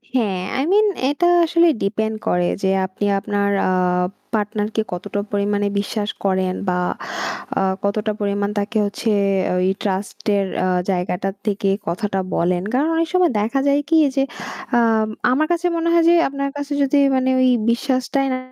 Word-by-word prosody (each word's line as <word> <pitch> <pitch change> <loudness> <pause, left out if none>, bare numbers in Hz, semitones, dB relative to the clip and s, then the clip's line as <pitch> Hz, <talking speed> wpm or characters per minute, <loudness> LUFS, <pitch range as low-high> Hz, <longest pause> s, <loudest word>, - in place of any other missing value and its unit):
হ্যাঁ, 200 -7 0 0.2
i - - +1
mean 425 +1 +4 0.2
এটা 345 +5 +1 0.2
আসলে 340 +1 +3 0.2
depend 220 +2 -1
করে 180 0 +2 0.2
যে 190 - +2 0.2
আপনি 190 +2 -4
আপনার 200 0 -1 0.2
আ - - +1 0.6
partner 210 0 -1
কে 220 - +2
কতটা 205 +3 -3
পরিমাণে 205 0 0
বিশ্বাস 205 +1 -2 0.2
করেন 185 -1 +1
বা 180 - 0 0.8
আ - - +1 0.2
কতটা 210 +1 0
পরিমাণ 200 0 -1
তাকে 205 +2 -1
হচ্ছে 210 +2 -2 0.5
ওই 185 - +2
trust 195 0 -3 0.2
এর 200 -1 +1 0.2
আ - - +1 0.2
জায়গাটা 180 +1 -1 0.2
থেকে 205 -1 0 0.2
কথাটা 195 +3 -2 0.2
বলেন। 175 +1 +1
কারণ 285 +5 +2
অনেক 330 0 +1
সময় 360 -5 +3
দেখা 235 +6 0
যায় 280 +1 +3
কি 330 - +3 0.2
যে, 270 - +3 0.6
আম 225 -2 +2 0.2
আমার 305 +4 +2
কাছে 345 +1 0
মনে 335 0 0
হয় 335 -1 +4
যে - - +6
আপনার 275 0 -3
কাছে 285 0 -4
যদি 275 +1 +2 0.2
মানে 260 0 +1
ওই 255 - +4 0.2
বিশ্বাসটাই 260 +2 0
না, 255 - -2
215 Hz, 165 wpm, -20 LUFS, 200-275 Hz, 0.8 s, যে